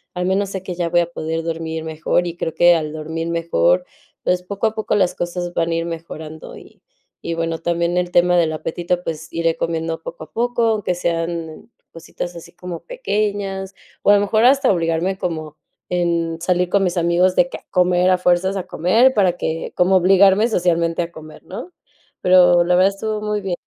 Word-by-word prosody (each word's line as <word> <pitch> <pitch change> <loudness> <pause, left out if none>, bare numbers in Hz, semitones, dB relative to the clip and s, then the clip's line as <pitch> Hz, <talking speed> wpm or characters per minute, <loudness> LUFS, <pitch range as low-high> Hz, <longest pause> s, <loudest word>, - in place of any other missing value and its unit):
al 180 0 -2
menos 195 +1 0
sé 190 -1 -5
que 185 - -5
ya 170 -1 -2
voy 175 +1 +3
a 170 0 -4
poder 165 0 -3
dormir 160 -1 -4
mejor 160 +2 -1
y 170 0 -5
creo 160 - -3
que 175 0 +6
al 155 -3 -1
dormir 160 +1 -5
mejor, 90 - +1 0.4
pues, 180 0 +1
poco 200 +4 -4
a 220 - +1
poco 220 -1 -1
las 185 -3 +2
cosas 175 0 -4
van 165 -1 0
a 165 - 0
ir 165 0 -1
mejorando 160 -2 -8
y - - -17 0.4
y 170 - -3
bueno, 165 0 -2
también 170 +1 -1
el 180 0 -1
tema 175 0 +4
del 160 -2 +2
apetito, 175 +3 -3
pues 160 -1 -5
iré 165 0 0
comiendo 165 0 -2
poco 165 0 -8
a 155 - -14
poco, 240 0 0
aunque 205 -5 0
sean, 165 +1 -3 0.2
cositas 175 +1 -7
así 170 0 -11
como 180 -1 -7
pequeñas, 205 - -3 0.3
o - - +3
a - - +7
lo 200 - +3
mejor 215 +3 +2
hasta 270 +1 +5
obligarme 170 +1 0
como 155 -4 -4 0.3
en 170 -2 -1
salir 180 +1 0
con 200 +1 +2
mis 180 0 -1
amigos 175 +2 +2
de 175 - +3
que - - -6
a - - -21
comer 180 0 +3
a 185 - +4
fuerzas 180 +2 +2
a 190 - -3
comer 225 +11 +3
para 190 -4 +3
que 165 +1 -3
como 180 +2 +3
obligarme 195 +3 +5
socialmente 170 -5 +1
a 170 0 -4
comer, 155 -2 -12
¿no?, 360 - -9 0.5
pero 180 -1 +6
la 180 +1 +3
verdad 185 +2 +5
estuvo 215 +2 -3
muy 210 0 -2
bien. 190 -3 -2
175 Hz, 205 wpm, -20 LUFS, 165-190 Hz, 0.5 s, a